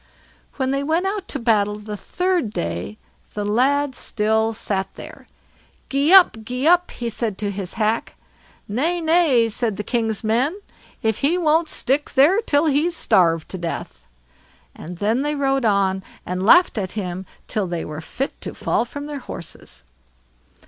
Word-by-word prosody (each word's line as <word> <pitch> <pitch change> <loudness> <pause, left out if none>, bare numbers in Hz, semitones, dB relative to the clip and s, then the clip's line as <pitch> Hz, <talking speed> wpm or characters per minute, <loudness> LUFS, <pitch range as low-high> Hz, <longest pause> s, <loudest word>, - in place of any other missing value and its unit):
When 265 -1 -1
they 275 0 0
went 320 +6 0
out 390 0 -2
to - - -3
battle 210 -4 +1
the 210 0 -7
third 360 - -1
day, 85 - -4 0.4
the 205 -1 -2
lad 265 +6 +2
still 220 -1 0
sat 195 -3 -3
there. - - -11 0.6
"Gee 280 +4 +2
up! 375 -10 +7
gee 250 +4 -3
up!" 355 +1 +4
he 240 - -5
said 225 -3 -3
to 205 -1 -2
his 195 -2 -5
hack. 220 0 -1 0.5
"Nay, 310 +12 0
nay", 320 -8 +3
said 220 -2 -1
the 210 - -3
king's 225 -2 -1
men; 250 - +1 0.4
"if 220 -1 0
he 315 +6 +2
won't 325 -1 +2
stick 280 +3 0
there 315 +11 +5
till 295 -8 +2
he's 310 +3 +2
starved 165 - +2
to 185 - -6
death." 170 - -6 0.7
And 175 +2 -9
then 220 +7 +1
they 295 +1 -1
rode 270 -2 +1
on, 195 -2 +2 0.2
and 180 +1 -3
laughed 350 - +5
at 185 -2 -4
him 185 -3 -5 0.2
till 205 -3 -1
they 170 -1 -3
were 155 +1 -6
fit 270 +11 -4
to - - -6
fall 235 - 0
from 285 +4 -7
their 295 -1 -5
horses. 170 -9 -10
235 Hz, 165 wpm, -21 LUFS, 205-290 Hz, 0.7 s, up